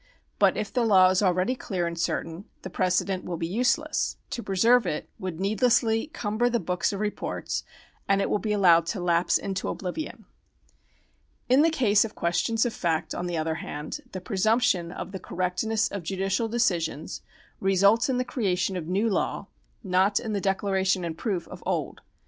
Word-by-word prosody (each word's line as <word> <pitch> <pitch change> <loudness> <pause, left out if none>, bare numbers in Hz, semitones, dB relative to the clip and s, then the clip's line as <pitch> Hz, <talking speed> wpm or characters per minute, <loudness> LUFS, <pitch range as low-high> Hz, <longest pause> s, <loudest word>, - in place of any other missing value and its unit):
But - - +4
if 210 - -3
the 245 - +2
law 190 -4 +6
is 185 - +2
already 185 +4 +2
clear 185 -8 -3
and 170 0 -3
certain, 165 +2 -3 0.2
the 190 - -7
pre 185 - +1
cedent 185 +1 0
will 175 - -4
be 165 - -2
useless; 250 - 0
to 240 - -3
preserve 225 +3 +3
it 150 - -3
would 180 -3 -5
needlessly 225 +4 +2
cumber 240 -6 -1
the 235 -1 +1
books 180 -1 -1
of 200 - -4
reports, 210 0 -3 0.5
and 195 0 +4
it - - +1
will 210 - 0
be 215 - -2
allowed 175 -5 +5
to 200 - -2
lapse 175 0 +2
into 195 -1 -4
oblivion. 195 - -5 1.2
In 260 +3 +6
the 325 - +5
case 220 -10 +3
of 225 -1 -7
questions 225 +7 +1
of 240 - -1
fact, 160 -3 -1
on 175 - -3
the 175 -1 -2
other 160 0 -1
hand, 150 -6 -6
the 185 - -5
presumption 200 -2 +1
of 180 +1 -7
the 190 - -6
correctness 185 +6 -1
of 200 - -5
judicial 195 +5 -1
decisions 175 -9 -1 0.4
results 200 +6 +3
in 255 - +1
the 250 - 0
creation 190 -6 -1
of 170 -3 -4
new 195 +6 +1
law, 210 - -1 0.3
not 190 +1 +2
in 225 -3 -4
the 200 - -1
declaration 190 -1 +1
and 165 -1 -4
proof 185 -2 -3
of - - -10
old. - - -2
195 Hz, 185 wpm, -26 LUFS, 180-225 Hz, 1.2 s, law